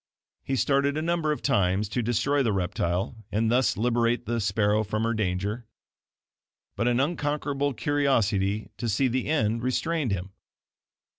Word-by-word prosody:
He 135 - -2
started 140 +2 +1
a - - 0
number 165 -2 0
of 150 - -3
times 100 -5 +2
to 120 +4 -1
destroy 120 +5 +1
the 115 -5 +1
reptile 95 +3 -2
and 110 +2 +1
thus 125 +1 +2
liberate 120 +1 +1
the 120 +1 -1
sparrow 105 +1 +2
from 110 +1 -2
her 115 +1 +1
danger, 105 +2 -2 1.1
but 115 - 0
an 120 0 +2
unconquerable 145 -2 -1
curiosity 110 -8 +1
to 120 - -2
see 130 +6 +2
the 130 +1 -1
end 115 -7 +1
restrained 140 +2 -1
him. 95 0 -3
115 Hz, 150 wpm, -26 LUFS, 105-140 Hz, 1.1 s, times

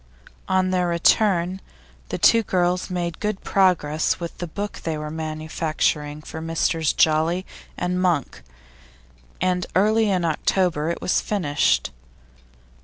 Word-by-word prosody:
On 185 0 +2
their 180 -1 +1
return, 180 +1 +2 0.5
the - - -2
two 230 - +5
girls 180 -3 0
made 175 -2 -3
good 210 -2 -3
progress 165 -6 +2
with 170 -1 -6
the 175 - -4
book 205 +5 -5
they 160 -2 -3
were 150 0 -5
manufacturing 155 -1 -2
for 160 - -7
Messrs 165 -1 0
Jolly 160 +4 +2 0.3
and 180 +1 -1
Monk, 175 -6 0 1.0
and 180 -1 0
early 215 +3 +3
in 180 -3 +1
October 165 -1 0
it 170 - -4
was - - +2
finished. 145 - +1
175 Hz, 125 wpm, -23 LUFS, 155-185 Hz, 1.0 s, two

